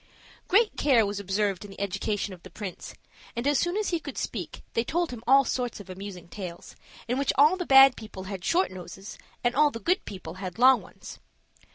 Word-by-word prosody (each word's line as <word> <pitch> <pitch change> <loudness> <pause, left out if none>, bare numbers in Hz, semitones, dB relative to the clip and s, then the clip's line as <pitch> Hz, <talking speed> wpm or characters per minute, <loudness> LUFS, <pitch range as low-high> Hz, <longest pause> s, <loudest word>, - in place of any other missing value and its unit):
Great 425 +4 +3
care 250 -7 +4
was 205 0 -3
observed 200 -1 -1
in 205 - -10
the 195 - -12
education 200 +1 -2
of 180 - -13
the 185 - -12
prince; 190 0 -8 0.4
and 235 +2 -3
as 290 0 +3
soon 350 +3 0
as 430 - 0
he 340 - 0
could 290 -4 -8
speak 185 -8 -5
they 230 - +1
told 340 +5 -1
him 240 -3 -8
all 275 +2 +7
sorts 245 -3 -2
of 190 -2 -10
amusing 185 -2 -8
tales, 175 -2 -8 0.3
in 250 +3 0
which 280 - +2
all 300 +6 +6
the 360 -2 -5
bad 270 -1 +8
people 215 -4 -9
had 190 -2 -6
short 360 - +2
noses, 185 +2 -9 0.2
and 240 0 +2
all 295 +3 +4
the 230 - -7
good 360 +9 +1
people 185 -4 -8
had 185 +1 -6
long 255 +1 +6
ones. - - -12
230 Hz, 215 wpm, -27 LUFS, 195-280 Hz, 0.4 s, bad